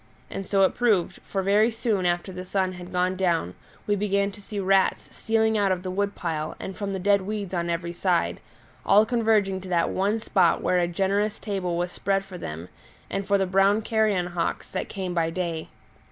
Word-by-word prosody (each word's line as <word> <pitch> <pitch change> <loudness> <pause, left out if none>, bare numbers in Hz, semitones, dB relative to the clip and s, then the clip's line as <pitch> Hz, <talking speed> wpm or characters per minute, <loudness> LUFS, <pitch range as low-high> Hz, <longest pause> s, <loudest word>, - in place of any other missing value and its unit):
And 195 - -5
so 195 -1 +3
it 190 - +3
proved, 215 -8 +1
for 195 -1 -3
very 205 +4 +4
soon 220 -5 0
after 175 +2 -1
the 185 0 -6
sun 185 0 -1
had 180 0 -9
gone 180 +1 +1
down 170 - 0 0.3
we 205 - +2
began 200 0 +1
to 205 - -13
see 205 +1 -6
rats 195 0 +1
stealing 220 -1 +1
out 200 -2 +2
of 180 -1 -1
the 185 - -3
woodpile 175 -5 -2
and 190 - -6
from 200 -1 -3
the 195 - -2
dead 200 +1 +3
weeds 200 -1 -4
on 170 -1 -1
every 170 0 -2
side, 175 -1 0 0.4
all 210 +2 +5
converging 220 -5 +1
to 190 - -9
that 170 -2 +1
one 200 +3 +1
spot 220 - +2
where 180 - +2
a 175 - +2
generous 200 +4 0
table 190 -5 -2
was 175 +1 -1
spread 195 +1 -1
for 185 -2 -9
them 80 - -6 0.4
and 195 0 -2
for 200 -1 +4
the 195 - +1
brown 195 +3 +3
carrion 215 -5 +1
hawks 170 -1 -2
that - - -3
came 185 -2 -4
by 165 -2 +1
day. 165 -2 -3
190 Hz, 205 wpm, -25 LUFS, 180-205 Hz, 0.4 s, all